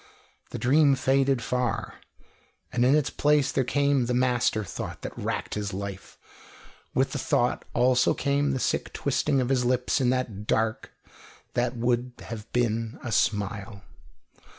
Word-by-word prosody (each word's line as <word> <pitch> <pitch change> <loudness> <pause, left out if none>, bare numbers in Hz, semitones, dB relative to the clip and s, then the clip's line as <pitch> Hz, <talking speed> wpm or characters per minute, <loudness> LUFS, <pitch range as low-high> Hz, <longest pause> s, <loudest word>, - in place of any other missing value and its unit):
The - - -5
dream 140 +2 +4
faded 135 -1 +2
far, 125 -1 -2 0.7
and 120 -1 +2
in 130 +3 +5
its 150 -3 +1
place 150 -2 +2
there 135 - +1
came 140 -1 +1
the 125 - 0
master 125 -3 +1
thought 95 - -7
that - - -6
racked - - -3
his 100 -2 -3
life; 100 -1 -7 0.8
with - - +2
the - - -3
thought - - 0
also 125 0 +3
came 140 0 +1
the 135 -2 -1
sick - - -1
twisting 135 - 0
of 125 -1 0
his 130 -2 +2
lips 125 +1 +1
in 125 - +3
the 130 0 +2
dark 110 0 -2 0.6
that 120 0 0
would 120 +1 0 0.2
have 110 -2 -7
been 115 -2 -1
a 120 - -4
smile. 100 -1 -1
125 Hz, 150 wpm, -26 LUFS, 115-135 Hz, 0.8 s, in